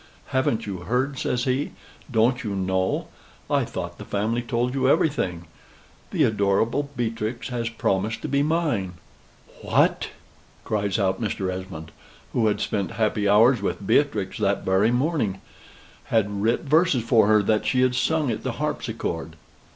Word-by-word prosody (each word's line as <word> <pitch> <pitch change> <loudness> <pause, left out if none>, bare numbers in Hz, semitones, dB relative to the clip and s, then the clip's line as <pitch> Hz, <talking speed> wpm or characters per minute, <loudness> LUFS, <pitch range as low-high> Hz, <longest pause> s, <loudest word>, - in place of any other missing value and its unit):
"Haven't 125 -4 0
you 100 -3 -4
heard?" 125 +9 -1
says 125 -1 -1
he. 130 +3 -1 0.4
"Don't 120 +2 +2
you 105 -3 -3
know? 95 0 0 0.4
I - - +2
thought - - -6
the - - -6
family 110 +4 -1
told 120 +1 -1
you 130 -1 +2
everything: 140 - +1 0.6
the - - +1
adorable 110 +6 +1
Beatrix 115 +1 -3
hath 115 -2 -3
promised 105 +4 0
to - - -2
be 140 0 +1
mine." 145 - 0 0.7
"What!" - - +2 0.6
cries 100 -1 0
out 95 0 0
Mr. 95 -4 -2
Esmond, 90 -4 -7 0.4
who 115 -2 +2
had 105 - 0
spent 100 -2 -2
happy 105 -2 +1
hours 115 +3 +5
with 100 0 -3
Beatrix 110 -4 +1
that - - 0
very 95 +4 +3
morning 125 - 0 0.7
had 105 -2 0
writ 115 +3 +2
verses 155 -4 +3
for 115 -2 +4
her, 105 -1 +4
that 105 +1 +1
she 125 - +2
had 130 -1 +3
sung 145 +1 +1
at 110 - -3
the - - -3
harpsichord. 80 -1 -3
110 Hz, 150 wpm, -24 LUFS, 100-130 Hz, 0.7 s, hours